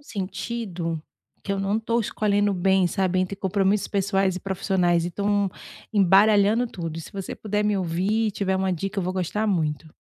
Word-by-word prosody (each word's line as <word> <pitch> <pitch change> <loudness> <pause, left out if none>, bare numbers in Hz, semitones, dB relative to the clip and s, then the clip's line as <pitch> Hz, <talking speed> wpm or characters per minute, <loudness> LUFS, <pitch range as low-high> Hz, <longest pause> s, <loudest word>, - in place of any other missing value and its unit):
sentindo, 190 - -4 0.4
que 195 - -2
eu 195 - -2
não 195 +2 0
estou 230 +1 0
escolhendo 205 -2 +1
bem, 190 0 +3
sabe 185 0 0
entre 185 +2 -2
compromissos 195 +1 +1
pessoais 195 -2 +1
e - - -5
profissionais 180 -3 +1
estão 200 +2 0 0.4
embaralhando 205 +3 +4
tudo 165 -7 -6
e - - -4
se - - -12
você 195 -2 -5
puder 210 0 -1
me 210 -1 +2
ouvir 190 +5 0
e - - -1
tiver 190 -1 -1
uma 190 0 0
dica, 195 +4 -3
eu - - -3
vou 185 - -1
gostar 190 +4 -1
muito. 160 -5 -1
195 Hz, 180 wpm, -24 LUFS, 180-205 Hz, 0.4 s, embaralhando